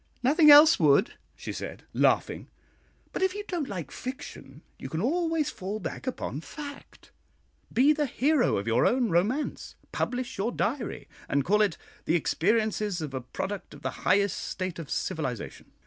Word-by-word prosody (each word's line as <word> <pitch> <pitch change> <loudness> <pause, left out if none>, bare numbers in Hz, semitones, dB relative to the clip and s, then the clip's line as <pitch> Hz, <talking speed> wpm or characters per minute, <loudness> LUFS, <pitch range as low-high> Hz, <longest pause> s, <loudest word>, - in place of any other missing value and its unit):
"Nothing 300 +4 +5
else 295 +2 +9
would," 155 +6 +4 0.2
she - - -6
said, - - -7
laughing; - - +1 0.7
"but - - -3
if 380 0 +1
you 415 - -4
don't 335 -7 -3
like 175 -9 -5
fiction, 250 - -8 0.2
you 130 - -7
can 160 - -3
always 325 - 0
fall 195 +3 -5
back 255 - -6
upon 155 - -4
fact; 285 - -10 0.6
be 275 +6 +5
the 300 -1 0
hero 275 +2 +2
of 100 - -3
your 115 +2 +3
own 245 -2 +2
romance, 215 - -1 0.2
publish 250 -4 -3
your 220 +5 0
diary, 240 +1 -3 0.2
and 140 -1 +1
call 210 +3 +3
it 200 -6 +1 0.3
'The 165 - +2
Experiences 210 +3 +1
of 150 -4 -5
a 130 - -3
Product 190 +10 -6
of - - -15
the - - -1
Highest 200 0 +2
State 185 -3 -4
of 160 - -7
Civilisation.' 130 -8 -4
215 Hz, 165 wpm, -28 LUFS, -, 0.7 s, else